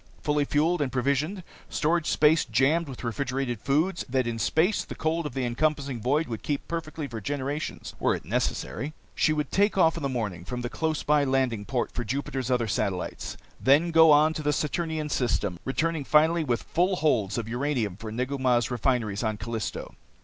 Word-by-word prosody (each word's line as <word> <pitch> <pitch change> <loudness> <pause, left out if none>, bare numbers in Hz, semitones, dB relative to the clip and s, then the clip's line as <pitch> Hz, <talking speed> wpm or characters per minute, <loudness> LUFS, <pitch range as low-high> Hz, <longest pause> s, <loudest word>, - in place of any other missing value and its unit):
Fully 150 -1 +1
fueled 155 +4 +1
and 135 -3 0
provisioned, 140 +9 0 0.3
storage 165 +1 +1
space 155 +1 +4
jammed 140 +7 +2
with 130 - -8
refrigerated 125 0 -2
foods 155 - +1
that 130 -1 +1
in 115 -1 -3
space 160 - +2
the - - -8
cold 160 0 -1
of 130 - -10
the 130 -2 0
encompassing 140 0 -1
void 145 +7 +1
would 115 -3 -5
keep 145 -2 -3
perfectly 160 -2 -4
for 115 -4 -6
generations 145 +4 -4
were - - +2
it - - -8
necessary, 125 - -2 0.2
she 155 - +2
would 150 -2 -1
take 205 +1 +2
off 165 -3 +4
in - - -4
the 140 - -1
morning 105 -9 -3
from 125 +6 -5
the 120 0 -4
close 160 -1 -1
by 150 -1 +3
landing 130 -6 0
port 125 +4 -1
for 120 - -3
Jupiter's 130 +1 -3
other 125 -3 +1
satellites, 95 -2 -2 0.2
then 150 +6 +4
go 160 0 +7
on 155 +1 +6
to 155 - -4
the 150 0 +1
Saturnian 155 +1 -1
system, 120 -10 0
returning 155 +3 0
finally 160 +4 +4
with 120 -5 -1
full 180 +3 +1
holds 120 - +1
of 115 -2 -3
uranium 120 -5 -1
for 110 +2 -7
Negu 130 +4 -2
Mah's 120 -3 +2
refineries 115 -4 0
on 110 -2 -1
Callisto. 115 -1 -4
140 Hz, 190 wpm, -27 LUFS, 120-155 Hz, 0.3 s, go